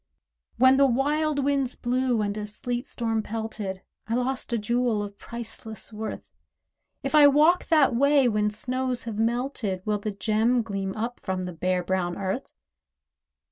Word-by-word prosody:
When 260 0 +5
wild 295 +1 +1
winds 275 -3 0
blew, 250 -2 0
and 205 0 -2
a 210 -1 -4
sleet 240 +4 -4
storm 225 -2 -1
pelted, 215 -4 -5 0.2
I 225 - 0
lost 255 +1 -1
a 235 - +1
jewel 235 0 0
of 200 0 -9
priceless 225 -1 -7
worth; 215 +1 -5 0.8
If 275 - -3
I 300 -1 +8
walk 305 +5 +4
that 300 -6 +4
way 280 +1 +4
when 210 -2 +1
snows 255 +3 -3
have 220 -2 -5
melted, 230 -5 -1
Will 210 -1 0
the 215 - -3
gem 220 +4 +1
gleam 195 -3 -4
up 230 +3 -3
from 185 -1 -3
the 180 - -5
bare 180 +2 0
brown 175 -1 -1
Earth? 195 +7 -3
230 Hz, 155 wpm, -26 LUFS, 210-260 Hz, 0.8 s, I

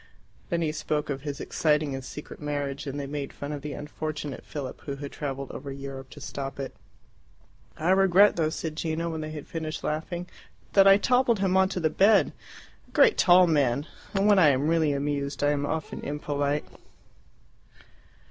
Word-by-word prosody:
Then 170 -2 0
he 155 - 0
spoke 155 -1 -2
of 135 -1 -4
his 145 -1 -5
exciting 150 -2 +1
and 135 0 -5
secret 150 +4 -9
marriage, 145 -1 -3
and 140 +1 -4
they 140 - -3
made 140 0 -4
fun 145 +1 -6
of 145 -1 -5
the 150 0 -5
unfortunate 150 -2 -5
Philip, 140 -4 -6
who 140 - -5
had 140 0 -7
travelled 140 -2 -5
over 140 +1 -7
Europe 135 -1 -7
to - - -12
stop 135 0 -6
it. 135 - -5 1.0
"I 165 +4 +1
regret 195 +1 +5
though," 160 -2 +1
said 160 -1 -4
Gino, 165 +1 -2
when 160 -1 -4
they 155 - -5
had 155 -2 -7
finished 160 -2 -5
laughing, 170 +3 -3 0.5
"that 195 -1 +7
I 195 0 +8
toppled 245 +1 +3
him 190 -1 +1
on 190 0 +4
to 190 - -3
the 160 -2 +1
bed. 200 +1 +4 0.5
A - - -23
great 470 - +6
tall 180 -1 +6
man! 145 -4 +2 0.3
And 195 +1 +2
when 205 -2 +6
I 160 -5 +7
am 140 +2 +1
really 160 -2 +3
amused 140 0 -2
I 145 - +4
am 145 0 -1
often 160 0 -4
impolite." 145 0 -2
150 Hz, 185 wpm, -27 LUFS, 140-170 Hz, 1.0 s, I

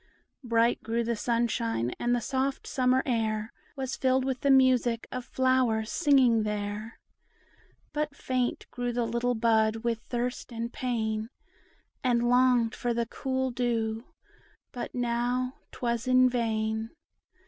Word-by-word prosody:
Bright 230 0 +2
grew 230 +1 -1
the 235 0 -1
sunshine, 230 - 0
and 240 0 +1
the 240 - -1
soft 265 +3 -1
summer 255 0 +2
air 220 -3 -1 0.2
Was 265 -2 -3
filled 260 0 +2
with 260 -2 -1
the 280 - +1
music 255 -3 +4
of 255 - -4
flowers 255 -4 +1
singing 265 -8 +4
there; 210 +1 -4 0.9
But 300 -1 -2
faint 255 -3 -1
grew 245 -1 -3
the 240 0 0
little 235 +2 0
bud 220 -1 +2
with 235 -1 0
thirst 245 +1 -4
and 235 +1 -4
pain, 220 -3 -2 0.7
And 240 -2 +2
longed 245 -2 +4
for 240 -1 -2
the 235 0 0
cool 260 +2 -2
dew; 230 -2 -1 0.7
but 245 - -6
now 245 +1 -1
't - - -14
was 235 +1 -1
in 255 0 +6
vain. 220 -2 -1
240 Hz, 135 wpm, -28 LUFS, 225-255 Hz, 0.9 s, in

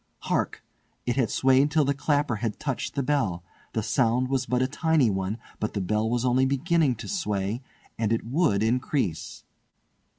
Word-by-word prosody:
Hark! - - -1 0.4
it 120 - 0
had 130 -5 +1
swayed 135 +2 +3
till 150 -1 +2
the 140 - +2
clapper 145 -4 0
had 110 -1 -3
touched 140 -3 -3
the 140 - 0
bell. 125 -12 0 0.3
The 110 - -1
sound 125 +2 +1
was 135 -1 0
but 125 0 +1
a - - +1
tiny 150 -4 +2
one, 95 +2 -2 0.2
but 110 - -3
the - - 0
bell 105 +4 0
was 120 +1 0
only 130 +1 +3
beginning 140 0 +2
to 115 - -8
sway, 105 - -2 0.4
and 110 -1 +1
it 115 - 0
would 125 - +2
increase. 120 - -1
125 Hz, 175 wpm, -26 LUFS, 110-140 Hz, 0.4 s, swayed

